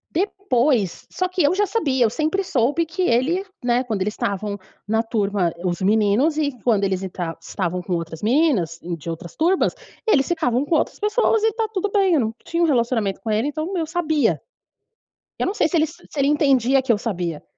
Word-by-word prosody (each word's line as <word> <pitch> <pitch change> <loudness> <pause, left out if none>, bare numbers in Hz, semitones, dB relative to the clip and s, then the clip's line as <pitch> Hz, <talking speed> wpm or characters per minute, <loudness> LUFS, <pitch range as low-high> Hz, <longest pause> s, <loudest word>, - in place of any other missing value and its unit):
Depois 275 - 0
só 370 - -1
que 365 0 -1
eu 295 +5 +3
já 415 +1 +2
sabia, 280 - +1
eu 220 - +2
sempre 315 - -1
soube 290 +1 +1
que 330 +4 -4
ele, 320 +5 +2 0.2
né, 245 +1 +2
quando 220 -6 -3
eles 210 +2 -2
estavam 200 0 -3 0.3
na 220 +1 +2
turma, 205 -6 0
os 175 -1 -1
meninos 215 +9 +2
e 295 -2 +1
quando 215 -5 +2
eles 190 -1 0
entra 175 -3 -4
estavam 180 0 -3
com 180 - -4
outras 165 -1 -5
meninas 220 - +2
e 175 0 -3
de 165 +1 -8
outras 165 +1 -7
turmas, 350 +4 +2 0.3
eles 275 -11 +3
ficavam 285 -6 0
com 320 - +1
outras - - 0
pessoas 435 +1 +2
e 445 - +4
tá 450 0 -1
tudo 400 +1 -1
bem, 390 -3 +3
eu 315 - +4
não 225 -2 -1
tinha 335 +1 -1
um - - +5
relacionamento 235 -7 +1
com 220 - -3
ele, 220 +6 +1
então 310 +6 -3
eu 325 -3 -1
sabia. 315 -3 +1 1.0
Eu - - 0
não 380 - 0
sei 320 - +2
se 340 - -1
ele 315 -1 +3
se 315 - -15
ele 275 -1 +2
entendia 275 -3 +3
que 260 - -6
eu 215 - +3
sabia. 175 -8 -3
260 Hz, 210 wpm, -22 LUFS, 205-330 Hz, 1.0 s, um